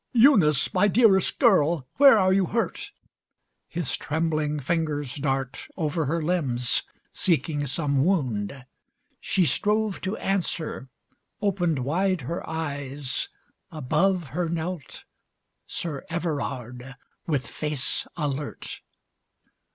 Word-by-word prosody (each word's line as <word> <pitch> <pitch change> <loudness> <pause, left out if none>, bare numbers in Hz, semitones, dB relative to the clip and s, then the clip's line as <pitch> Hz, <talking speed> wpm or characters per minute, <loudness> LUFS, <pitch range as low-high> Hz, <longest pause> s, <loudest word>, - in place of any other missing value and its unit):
"Eunice, 215 - +5
my 205 - +4
Dearest 205 -3 +4
Girl, 170 - +3
where 275 -4 +8
are 185 -2 +4
you 190 -2 +2
hurt?" 230 +5 -2 0.8
His 170 -5 -2
trembling 155 -1 -1
fingers 145 -2 -1
dart 135 -2 -2
Over 160 -1 -1
her 165 +2 -1
limbs 130 -9 +2 0.3
seeking 150 -3 0
some 140 -1 +1
wound. 130 - -1 0.5
She 185 - +1
strove 210 +4 +1
To 190 +3 -3
answer, 170 -8 -2 0.5
opened 175 - 0
wide 185 +4 +1
her 165 +8 -4
eyes, 145 -4 -3 0.4
above 160 +3 0
Her 165 +5 -2
knelt 170 -2 -4 0.6
Sir 150 -5 -4
Everard, 135 -6 -4 0.3
with 145 -5 0
face 150 -5 -2
alert. 145 -2 -4
160 Hz, 105 wpm, -25 LUFS, 140-180 Hz, 0.8 s, where